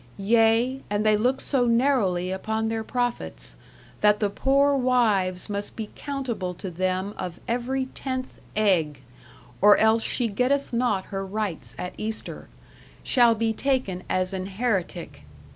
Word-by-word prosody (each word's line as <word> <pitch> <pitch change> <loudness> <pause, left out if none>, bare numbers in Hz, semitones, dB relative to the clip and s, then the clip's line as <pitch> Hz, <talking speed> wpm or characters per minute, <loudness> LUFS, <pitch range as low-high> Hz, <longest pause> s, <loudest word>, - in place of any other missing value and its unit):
Ye, 225 +5 +3
and 205 +1 0
they 215 0 +5
looke 250 +5 +1
so 255 -4 +1
narowly 230 -8 +2
uppon 220 +3 -2
theyre 225 0 -2
proufittes, 245 +1 -3 0.5
that 210 0 +4
the 205 -2 0
poore 280 +4 +3
wyves 220 -8 +1
must 205 -1 -4
be 220 -2 -6
countable 245 -11 -4
to 185 +1 -6
thym 185 +3 -1
of 180 -2 -5
every 255 +3 -1
tenth 260 0 -5 0.2
eg, 170 -10 +1 0.6
or 205 +1 +7
elles 220 +1 +4
she 240 +1 0
gettith 250 +6 0
not 235 -6 +1
her 195 0 -2
rytes 195 -3 -3
at 180 - -5
ester, 220 +1 -5 0.6
shal 240 -3 +4
be 225 0 0
taken 250 -8 -1
as 185 +1 0
an 190 0 -3
heretike.... 190 - -2
220 Hz, 145 wpm, -25 LUFS, 190-250 Hz, 0.6 s, or